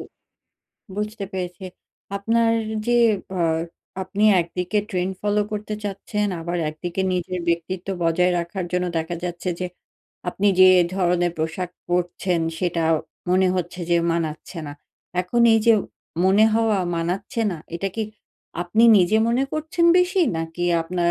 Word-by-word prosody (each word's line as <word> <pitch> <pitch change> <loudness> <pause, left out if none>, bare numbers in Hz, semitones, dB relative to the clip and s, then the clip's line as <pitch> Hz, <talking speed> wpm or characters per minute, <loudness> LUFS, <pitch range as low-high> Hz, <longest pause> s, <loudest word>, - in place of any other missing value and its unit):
উ - - -5 0.9
বুঝতে 210 0 -3
পেরেছি। 180 0 -5 0.5
আপনার 225 +3 +2 0.4
যে 240 0 +3 0.4
আ - - 0 0.6
আপনি 195 +3 -1 0.2
একদিকে 180 +4 -2
ট্রেন্ড 185 0 -1
ফলো 210 0 +2
করতে 210 0 -3
চাচ্ছেন। 205 +1 -2
আবার 175 +1 -3
একদিকে 175 +4 -3
নিজের 180 0 -2
ব্যক্তিত্ব 170 +2 -2
বজায় 180 +2 +3
রাখার 175 +2 -3
জন্য 180 0 +1
দেখা 165 +2 -3
যাচ্ছে 175 +1 -4
যে, 180 - -1 0.6
আপনি 205 +3 +1
যে 185 - +9 0.3
ধরনের 175 -2 +1
পোশাক 165 +3 -2 0.2
পড়ছেন 175 0 0 0.2
সেটা 170 -2 0 0.5
মনে 185 0 +4
হচ্ছে 180 0 -3
যে 170 - +5 0.2
মানাচ্ছে 165 +1 -4
না। 145 - -6 0.5
এখন 185 +7 -1
এই 225 - +5
যে 230 - +8 0.5
মনে 195 +3 +5
হওয়া 225 -2 +2 0.2
মানাচ্ছে 190 +8 -2
না। 170 - -5 0.2
এটা 195 +3 -2
কি 220 - 0 0.6
আপনি 180 +6 +1 0.2
নিজে 185 +4 +3
মনে 245 +3 +2
করছেন 320 +2 0
বেশি? 365 +2 +2 0.2
নাকি 165 +2 -3 0.2
আপনার 170 +1 0
180 Hz, 140 wpm, -23 LUFS, 175-210 Hz, 0.9 s, যে